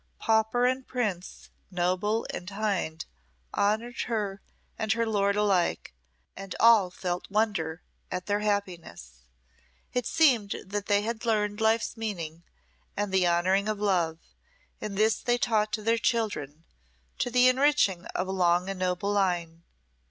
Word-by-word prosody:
Pauper 220 +2 +2
and 255 +1 0
prince, 210 -8 -4 0.2
noble 185 +5 0
and 180 - -6
hind 195 -6 -2 0.5
honoured 220 +4 0
her 205 -4 -2 0.3
and 220 0 -2
her 230 +1 0
lord 200 -2 +1
alike, 195 - +1 0.4
and 195 0 -7
all 225 -5 +6
felt 180 0 -4
wonder 190 -6 -1 0.3
at 180 0 -4
their 205 0 0
happiness. 180 - -3 0.7
It 250 -2 -1
seemed 245 -11 +3
that 200 +1 -4
they 205 0 +2
had 225 0 -4
learned 210 -2 0
life's 220 +1 +1
meaning 170 -8 -5 0.6
and 205 -1 -2
the 185 -2 +3
honouring 185 +4 +2
of 215 -1 -2
love, 175 -6 +1 0.6
and 200 -2 -5
this 215 +1 +3
they 240 0 +1
taught 220 -4 +1
to 215 - -2
their 230 +1 +2
children, 205 - -1 0.6
to - - 0
the 250 +1 +5
enriching 255 -9 +3
of 185 - -3
a - - -3
long 180 0 +2
and 195 - -7
noble 185 +2 -1
line. 175 -4 0
205 Hz, 145 wpm, -28 LUFS, 180-220 Hz, 0.7 s, all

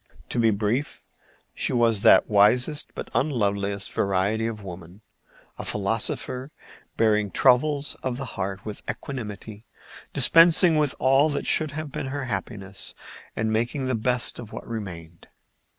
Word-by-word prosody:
To - - -2
be 115 -1 +4
brief, 110 +7 -2 0.5
she - - -1
was 115 -4 +3
that - - +6
wisest 125 +9 +3
but - - -7
unloveliest 100 -7 -1
variety 100 +3 0
of 110 -2 -6
woman, 90 +1 -10 0.6
a - - -4
philosopher, 115 +5 -2 0.5
bearing 105 -2 +2
troubles 140 +5 +2
of 125 -2 -3
the 135 - -5
heart 95 0 -4
with 105 -1 -6
equanimity, 110 -4 -7 0.4
dispensing 165 0 +5
with 150 -3 +1
all 135 +3 +3
that 145 - -3
should 155 -1 +1
have 155 -2 -5
been 135 - -4
her 140 +1 -4
happiness 100 -2 -4 0.4
and 110 0 -1
making 120 +5 -1
the 130 - -1
best 125 +2 0
of 115 -3 -9
what - - -8
remained. 85 -7 -8
115 Hz, 140 wpm, -25 LUFS, 100-130 Hz, 0.6 s, that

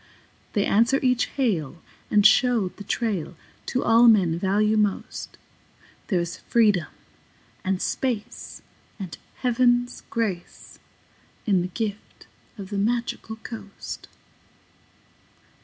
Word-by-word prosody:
They 205 - +2
answer 235 +6 +3
each 250 -1 +3
hail 175 - -1 0.3
and 205 -1 +4
show 230 -3 +5
the 205 - -11
trail 200 -6 -2 0.3
To 255 - 0
all 230 +1 +6
men 180 -7 +4
value 210 +3 +2
most. 210 -2 -1 0.7
There 185 -5 +1
is 170 +1 -3
freedom 210 -8 +2 0.8
and 190 -1 0
space 240 -2 -3 0.3
and 190 -6 -6 0.3
Heaven's 245 0 +2
grace 200 -7 -4 0.7
In 195 -5 +3
the 180 - -2
gift 210 +2 -5 0.3
of 195 -1 -8
the 200 - -1
Magical 235 +1 -1
Coast. 220 -3 -8
210 Hz, 105 wpm, -25 LUFS, 190-235 Hz, 0.8 s, all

